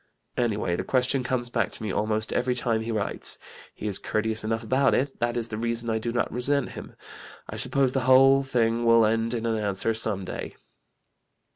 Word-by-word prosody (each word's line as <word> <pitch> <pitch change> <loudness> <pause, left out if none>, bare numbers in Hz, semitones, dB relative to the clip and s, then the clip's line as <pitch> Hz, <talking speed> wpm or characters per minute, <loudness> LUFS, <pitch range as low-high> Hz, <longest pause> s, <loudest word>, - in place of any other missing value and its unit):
"Anyway 105 -7 0
the - - -3
question 130 +1 +1
comes 125 -1 -2
back 115 -6 0
to - - -8
me 105 - -2
almost 110 +1 -1
every 125 0 0
time 115 -2 0
he 115 +1 -4
writes. 105 -2 -2 0.4
He - - -8
is 100 -3 +1
courteous 110 +1 -1
enough 115 +1 -2
about 130 +5 +2
it 135 +1 -1
that 120 +1 0
is 115 -1 -2
the 105 - -4
reason 115 0 -1
I 110 - 0
do 115 +1 -3
not 120 - -1
resent 140 +3 +1
him. - - -10 0.5
I - - -7
suppose 135 -2 +1
the 135 - 0
whole 135 +1 +7
thing 120 -3 0
will 115 -1 +5
end 115 +2 0
in 115 0 -3
an 115 -1 0
answer 105 +2 0
some 110 -4 -1
day." - - -6
115 Hz, 200 wpm, -26 LUFS, 110-125 Hz, 0.5 s, whole